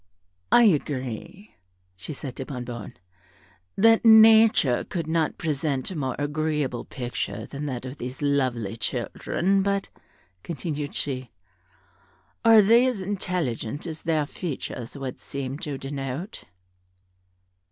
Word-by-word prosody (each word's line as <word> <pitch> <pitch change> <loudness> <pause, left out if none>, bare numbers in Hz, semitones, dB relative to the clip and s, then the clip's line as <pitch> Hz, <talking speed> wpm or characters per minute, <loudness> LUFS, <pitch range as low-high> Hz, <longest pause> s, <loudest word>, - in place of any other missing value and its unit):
"I 240 - +7
agree," 145 - -1 0.4
said 95 +11 -7
she 135 - -3
to 130 +2 -7
Bonnebonne, 120 -5 -6 0.8
"that 225 +2 +5
nature 220 - +7
could 170 -3 -4
not 160 0 0
present 145 -2 -1
a - - -5
more 130 -5 -2
agreeable 150 -3 -1
picture 125 -3 -4
than 145 +1 -6
that 125 -2 -4
of 130 +2 -7
these 125 +1 -6
lovely 130 -7 0
children; 195 - 0
but," 200 0 -1 0.5
continued 150 - -4
she, 130 -3 -2 1.1
"are 225 -2 +8
they 235 +5 +5
as 250 -5 -1
intelligent 175 - -3
as 160 -2 -6
their 155 -3 +1
features 140 -6 -6
would 135 -2 -5
seem 140 0 -5
to 145 -4 -4
denote?" 135 - -5
145 Hz, 120 wpm, -25 LUFS, 130-185 Hz, 1.1 s, are